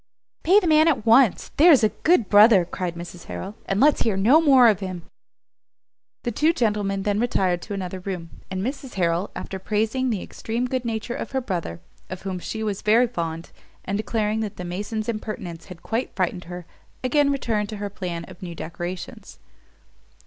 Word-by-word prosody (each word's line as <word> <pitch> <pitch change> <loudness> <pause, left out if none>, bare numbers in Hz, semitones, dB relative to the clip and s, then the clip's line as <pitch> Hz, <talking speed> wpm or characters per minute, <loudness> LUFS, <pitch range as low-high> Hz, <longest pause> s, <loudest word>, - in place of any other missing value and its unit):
"Pay 380 +5 +5
the 420 - -4
man 310 -1 +5
at 280 -9 +1
once, 230 -2 +4
there's 300 -5 +7
a 215 - +5
good 315 - +2
brother," 205 -3 +6
cried 175 0 -4
Mrs 175 0 -9
Harrel, 195 - -6
"and 195 - 0
let's 295 +3 +4
hear 215 -4 +1
no 245 +12 +5
more 265 -6 +6
of 210 -5 +3
him." 185 -3 -5 1.2
The 240 - -1
two 305 +9 +2
gentlemen 210 -6 0
then 205 0 0
retired 185 -7 +1
to 205 - -6
another 185 -1 -5
room, 180 -3 -6 0.2
and 190 0 -3
Mrs 265 +1 -5
Harrel, 175 +1 0
after 190 - -6
praising 220 +6 0
the 210 -6 -2
extreme 235 +3 -3
good 250 -1 -2
nature 230 +1 -3
of - - -6
her 265 - +1
brother, 170 - -4 0.3
of 185 0 -7
whom 190 -2 -4
she 220 +5 -5
was 205 -3 -2
very 225 +4 +4
fond, 165 -7 -5 0.3
and 195 - -2
declaring 215 0 -1
that 215 -3 -4
the 180 - -6
mason's 210 +5 -4
impertinence 215 -7 -5
had 180 -3 -12
quite 230 +3 -3
frightened 185 -1 -1
her, 175 0 -8 0.4
again 280 +2 +3
returned 225 -7 -1
to 215 - -6
her 205 0 -5
plan 175 -4 -5
of - - -14
new 175 -2 -7
decorations. 175 +3 -7
210 Hz, 185 wpm, -23 LUFS, 180-240 Hz, 1.2 s, there's